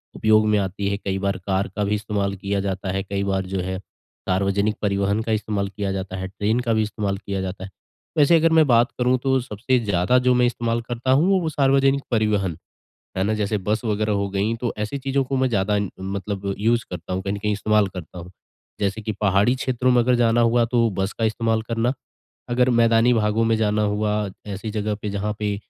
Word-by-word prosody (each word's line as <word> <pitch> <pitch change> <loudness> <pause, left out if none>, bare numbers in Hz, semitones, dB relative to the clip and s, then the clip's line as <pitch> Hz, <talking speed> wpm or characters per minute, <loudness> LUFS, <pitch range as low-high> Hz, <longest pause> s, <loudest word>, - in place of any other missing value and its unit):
उपयोग 110 0 +4
में 105 0 +3
आती 100 +1 -2
है, 100 - -1
कई 100 -1 -3
बार 100 0 -1
कार 95 0 +1
का 105 - 0
भी 105 +1 +1
इस्तेमाल 100 -2 -2
किया 100 +1 -2
जाता 95 -1 -3
है। 95 +1 -2
कई 100 0 -3
बार 95 -1 -1
जो 95 +1 -3
है 95 +1 -4
सार्वजनिक 100 +2 -2
परिवहन 100 +1 0
का 115 - -3
इस्तेमाल 105 -2 -1
किया 100 0 -3
जाता 95 -1 -4
है, 95 0 -4
ट्रेन 105 +4 -1
का 120 -2 0
भी 110 - +2
इस्तेमाल 105 -2 -2
किया 100 -1 -4
जाता 95 0 -5
है। 95 - -7 0.5
वैसे 150 +3 +5
अगर 165 0 +3
मैं 160 -1 +6
बात 120 -1 +4
करूँ 125 +1 +2
तो 135 -1 +2
सबसे 125 +2 -1
ज़्यादा 100 +1 +2
जो 125 0 +3
मैं 125 0 +4
इस्तेमाल 120 -1 -1
करता 120 +2 -2
हूँ, 180 +8 +4
वो 160 - -1
सार्वजनिक 135 -1 +2
परिवहन, 105 -7 +1 0.6
है 95 - +1
ना? 105 +2 +1
जैसे 105 0 -1
बस 105 +4 -2
वगैरह 105 0 0
हो 100 0 0
गई 100 +4 0
तो 120 - -1
ऐसी 105 +6 -3
चीज़ों 135 +1 0
को 135 +1 -3
मैं 130 0 +2
ज़्यादा 105 -2 +1 0.2
मतलब 100 +1 -3
यूज़ 115 +3 +2
करता 90 +1 -6
हूँ, 95 - -2
कहीं 100 +1 -3
न - - -3
कहीं 105 +1 -1
इस्तेमाल 105 0 +2
करता 90 -2 -9
हूँ। 90 +1 -10 0.5
जैसे 100 +2 -1
कि 110 +1 -3
पहाड़ी 105 +4 +3
क्षेत्रों 130 -1 0
में 125 -1 +4
अगर 125 +1 +2
जाना 120 -1 +3
हुआ, 115 0 +3
तो 115 -1 +2
बस 95 +1 -2
का 115 - -4
इस्तेमाल 110 0 0
करना, 115 +2 -1 0.6
अगर 125 +1 +2
मैदानी 115 0 +4
भागों 110 0 +1
में 115 0 +3
जाना 105 -1 +1
हुआ, 105 0 0 0.3
ऐसी 100 +2 -5
जगह 105 0 -2
पे 105 - -3
जहाँ 100 +1 -2
पे 105 -1 -1
105 Hz, 220 wpm, -22 LUFS, 100-120 Hz, 0.6 s, मैं